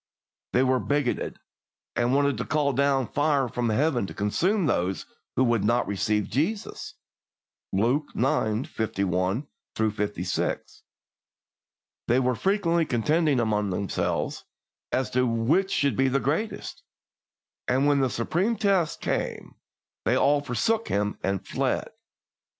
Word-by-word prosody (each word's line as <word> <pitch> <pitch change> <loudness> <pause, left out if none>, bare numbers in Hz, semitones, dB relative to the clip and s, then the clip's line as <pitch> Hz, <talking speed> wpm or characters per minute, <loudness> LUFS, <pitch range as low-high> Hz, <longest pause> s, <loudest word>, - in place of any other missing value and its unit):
They 125 - +4
were 130 0 +2
bigoted, 145 -2 -1 0.6
and 120 +2 +2
wanted 140 -1 +2
to - - 0
call 145 -3 +1
down 135 0 +2
fire 145 0 +1
from 120 0 -1
Heaven 120 -1 +1
to - - -9
consume 180 - +1
those 95 -8 0 0.3
who 130 - +3
would 120 -4 +2
not 120 +3 +2
receive 105 +1 0
Jesus 190 - -2 0.8
(Luke 120 +10 +1
ix. 110 -2 +1
51 100 - -1 0.3
56); 105 -4 -2 1.3
they 120 +2 +4
were 125 -1 +2
frequently 170 - +1
contending 150 +4 +2
among 105 -3 +1
themselves 95 +1 -2 0.5
as 130 0 0
to 125 0 +2
which 125 +12 +2
should 140 -5 +1
be 135 +3 +3
the 135 +1 +2
greatest, 150 - -2 0.9
and 130 +3 +2
when 145 -1 +4
the 130 -1 +2
supreme 175 - 0
test 195 -7 +1
came - - -3 0.5
they - - +2
all 145 +1 +3
forsook 220 - 0
Him 105 +1 -1
and 95 -1 -2
fled. - - -1
130 Hz, 125 wpm, -26 LUFS, 110-145 Hz, 1.3 s, They